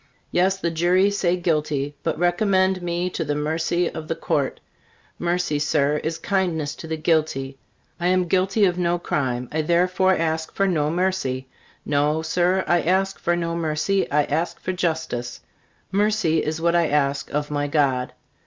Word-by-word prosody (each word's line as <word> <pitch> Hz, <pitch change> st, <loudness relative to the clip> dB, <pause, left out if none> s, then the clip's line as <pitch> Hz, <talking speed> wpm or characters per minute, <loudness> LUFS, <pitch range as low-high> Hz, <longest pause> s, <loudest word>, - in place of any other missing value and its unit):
Yes, 190 Hz, +2 st, +2 dB
the 170 Hz, -3 st, -2 dB
jury 180 Hz, +4 st, +3 dB
say 180 Hz, -3 st, +1 dB
guilty, 150 Hz, -4 st, -1 dB
but 165 Hz, -, -2 dB
recommend 185 Hz, +1 st, +2 dB
me 175 Hz, 0 st, -1 dB
to 170 Hz, -, -2 dB
the 145 Hz, -1 st, -2 dB
mercy 160 Hz, +3 st, 0 dB
of 160 Hz, -1 st, -6 dB
the 165 Hz, -, -1 dB
Court. 140 Hz, -4 st, -1 dB, 0.6 s
Mercy, 175 Hz, -3 st, 0 dB
Sir, 150 Hz, 0 st, +1 dB
is 160 Hz, +2 st, -3 dB
kindness 175 Hz, -7 st, -1 dB
to 160 Hz, -, -8 dB
the 160 Hz, 0 st, -3 dB
guilty. 150 Hz, -4 st, 0 dB, 0.4 s
I 175 Hz, -, 0 dB
am 185 Hz, 0 st, +3 dB
guilty 195 Hz, +4 st, +2 dB
of 180 Hz, -1 st, 0 dB
no 175 Hz, 0 st, +1 dB
crime, 125 Hz, -7 st, -2 dB
I 155 Hz, -, 0 dB
therefore 180 Hz, +3 st, +2 dB
ask 160 Hz, -1 st, -2 dB
for 195 Hz, -, +2 dB
no 150 Hz, -5 st, +1 dB
mercy. 170 Hz, -7 st, -1 dB, 0.4 s
No, 150 Hz, +2 st, +1 dB
Sir, 180 Hz, +3 st, +1 dB
I 175 Hz, -1 st, +3 dB
ask 190 Hz, +2 st, +1 dB
for 175 Hz, -, +1 dB
no 170 Hz, -1 st, -2 dB
mercy; 165 Hz, +4 st, 0 dB
I 150 Hz, +1 st, +3 dB
ask 160 Hz, +5 st, -2 dB
for 185 Hz, -, -3 dB
justice. 160 Hz, -9 st, -2 dB, 0.5 s
Mercy 205 Hz, -6 st, +2 dB
is 155 Hz, +1 st, -2 dB
what 170 Hz, +1 st, +2 dB
I 170 Hz, -2 st, +3 dB
ask 140 Hz, -1 st, 0 dB
of 150 Hz, 0 st, -2 dB
my 145 Hz, 0 st, -1 dB
God. 140 Hz, -4 st, +1 dB
165 Hz, 170 wpm, -23 LUFS, 150-180 Hz, 0.6 s, jury